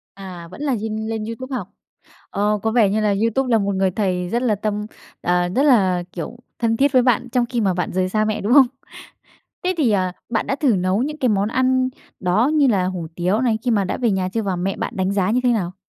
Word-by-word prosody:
À, 180 -3 -9
vẫn 285 - -9
là 275 -4 +1
nhên 220 0 -3
lên 220 -1 -3
YouTube 255 +4 -5
học? 190 -5 -5 0.6
Ồ, 210 +1 0
có 220 +2 -1
vẻ 225 -4 +4
như 215 +2 0
là 210 -1 +2
YouTube 250 +3 +1
là 225 - +5
một 200 -1 -1
người 190 0 +1
thầy 180 -2 -1
rất 235 +5 0
là 235 -4 +2
tâm 210 +1 -3 0.4
à, 175 0 +1
rất 260 +10 +1
là, 190 -11 +3
kiểu, 180 +7 -6 0.2
thân 225 -1 +1
thiết 280 +2 +3
với 255 -2 +5
bạn 245 0 +1
trong 245 0 +1
khi 235 -1 -2
mà 190 -3 +2
bạn 180 - -2
rời 185 0 0
xa 215 +2 +1
mẹ, 215 0 -1
đúng 215 +5 +1
không? 275 -2 +8 1.0
Thế 370 +1 +1
thì, 285 -8 +2
à, 185 -3 +1 0.2
bạn 225 -1 -1
đã 270 - -1
thử 260 -9 +2
nấu 185 +4 +1
những 300 +3 -3
cái 255 - +1
món 205 -1 +1
ăn 255 +1 +2 0.3
đó 195 +8 +2
như 295 -3 +4
là 195 -7 +2
hủ 180 -3 -4
tiếu 180 +5 0
này 230 -4 +1
khi 245 - 0
mà 205 -3 +2
đã - - -2
về 240 -3 +1
nhà 190 -1 0
chưa 225 +4 -2
và 195 -3 -2
mẹ 190 +2 -2
bạn - - -4
đánh 190 +1 0
giá 195 -1 +1
như 245 +3 +2
thế 245 - +4
nào? 185 -5 -2
215 Hz, 255 wpm, -21 LUFS, 190-245 Hz, 1.0 s, không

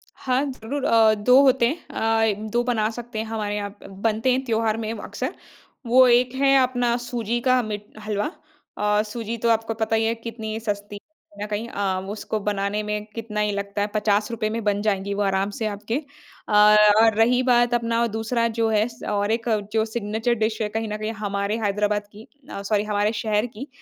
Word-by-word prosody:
हाँ, 255 +1 0
ज़रूर 260 +3 -5
अ, 225 -3 +5
2 250 +6 +5
होते 260 -3 +4
हैं 310 +7 -4 0.5
अ, 215 +2 -7
2 240 +2 +1
बना 225 -3 0
सकते 235 -1 -7
हैं 220 - -2
हमारे 215 -2 -3
यहाँ 205 -1 -3
प - - -11
बनते 220 +5 0
हैं 260 +1 +1
त्योहार 225 -2 0
में 220 -1 -3
अक़्सर। 215 - -5 0.5
वो 255 +2 +6
एक 245 +1 +3
है 275 0 +4
अपना 245 -2 +1
सूजी 240 -1 -2
का 255 0 +3
मीट 210 -1 -5 0.2
हलवा 210 -1 -1 0.5
अ, 210 0 +2
सूजी 225 +1 -5
तो 230 +1 0
आपको 225 0 +1
पता 225 0 -1
ही 225 0 +2
है 225 +1 +1
कितनी 225 -1 -6
सस्ती 205 -2 -4
है - - -7 0.4
कहीं 205 - -4
न - - -7
कहीं 210 +2 -3
अ, 195 -3 -1
उसको 215 +1 -3
बनाने 205 0 -1
में 210 0 -3
कितना 220 -2 -4
ही 210 0 +1
लगता 200 0 -3
है 205 - +1
₹50 210 0 +1
रुपए 215 -2 -1
में 225 0 -3
बन 205 -1 +1
जाएगी 200 -1 -1
वो 205 - -2
आराम 195 0 +1
से 225 - -1
आपके। 210 +2 -4 0.5
अ, - - -4 0.5
और 225 -1 +4
रही 245 +3 +4
बात 240 -1 +3
अपना 230 0 +1
दूसरा 230 +1 0
जो 225 -1 +2
है 215 0 +2
स 235 -1 -13
और 205 0 0
एक 230 +1 -1 0.3
जो 220 -1 +2
सिग्नेचर 220 +1 -1
डिश 220 0 -1
है 210 - 0
कहीं 225 +1 -3
न - - -2
कहीं 215 +1 -3
हमारे 200 +1 -1
हैदराबाद 205 0 0
की 215 +2 -13 0.2
अ, 200 - -6
सॉरी 205 +1 0
हमारे 210 0 0
शहर 215 0 0
की 245 +3 -8
220 Hz, 210 wpm, -23 LUFS, 210-235 Hz, 0.5 s, वो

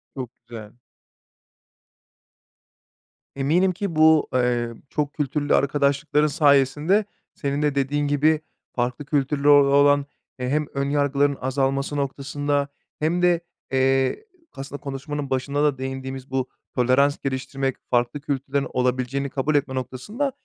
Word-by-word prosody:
Çok 130 -3 -5 0.2
güzel. 110 -2 -9 2.6
Eminim 165 +8 +2
ki 190 -2 -4
bu, 155 0 +5
eee, 120 -2 +1 0.2
çok 145 -1 -2
kültürlü 145 0 0
arkadaşlıkların 145 +2 +2
sayesinde 145 +7 +3 0.3
senin 140 0 -2
de 150 -2 +1
dediğin 145 +1 0
gibi 150 +2 +2 0.3
farklı 125 +3 -2
kültürlere 145 0 +1
o 145 - +9
olan, 145 0 +5 0.3
eee, 125 - -2
hem 150 +2 +1
önyargıların 140 0 +1
azalması 135 +2 -1
noktasında 145 +1 -1 0.3
hem 165 +3 0
de, 175 -1 +3 0.3
eee, 135 - +1 0.3
aslında 135 +1 -7
konuşmanın 140 +1 -5
başında 140 +3 0
da 145 -3 +2
değindiğimiz 130 0 -6
bu 130 -1 -1 0.3
tolerans 130 +3 +3
geliştirmek, 135 0 -3
farklı 120 +3 0
kültürlerin 140 -1 -2
olabileceğini 130 +2 0
kabul 145 +3 -1
etme 140 -2 0
noktasında, 205 - -3
140 Hz, 115 wpm, -23 LUFS, 130-145 Hz, 2.6 s, o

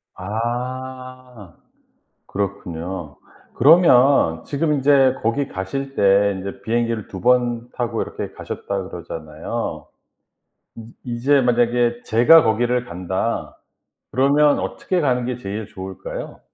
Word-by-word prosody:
아. 125 +1 -6 0.7
그렇군요. 90 -5 -5 0.4
그러면 135 - +5
지금 150 +2 -1
인제 135 -1 +4
"거기 130 +5 0
가실 135 +9 -5
때 100 0 +4
인제 95 +1 -7
비행기를 115 0 -1
2 95 - -8
번 120 -1 +1
타고 120 -3 -2
이렇게 - - -6
가셨다."고 95 -2 -5
그러잖아요. 80 0 -6 0.9
음 115 0 -10
이제 130 +4 +2
만약에 120 -1 +1
"제가 125 +9 +6
거기를 120 +2 +1
간다." 95 +3 -3 0.5
그러면 145 +3 +3
어떻게 185 -1 -2
가는 125 -3 +1
게 125 -1 -2
제일 105 -2 -5
좋을까요? 95 0 -8
120 Hz, 240 characters per minute, -21 LUFS, 100-130 Hz, 0.9 s, 제가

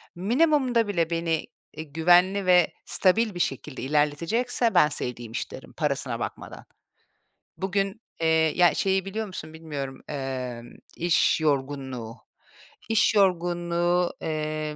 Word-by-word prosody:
minimumda 245 - +2
bile 170 -5 0
beni, 165 -1 -1 0.3
iii, 155 -2 -8
güvenli 180 +4 +4
ve 180 -2 +4
stabil 210 +3 +2
bir - - -5
şekilde 135 -2 -3
ilerletecekse 165 - 0
ben 160 -4 +6
"sevdiğim 120 -6 -5
iş" - - -4
derim - - -11
parasına - - -2
bakmadan. - - -7 0.9
Bugün 195 +3 -2 0.2
Eee, 165 - +2 0.3
ya, 175 -1 +5
şeyi 190 -1 +1
biliyor 215 +2 -4
musun, 160 -4 -8
bilmiyorum: 145 -4 -6
Emm, 130 -4 -5 0.2
"iş 170 -1 +2
yorgunluğu." 135 -5 -2 0.7
İş 220 0 +3
yorgunluğu, 175 -2 +1
eee, 155 -1 -3
170 Hz, 120 wpm, -26 LUFS, 150-195 Hz, 0.9 s, ben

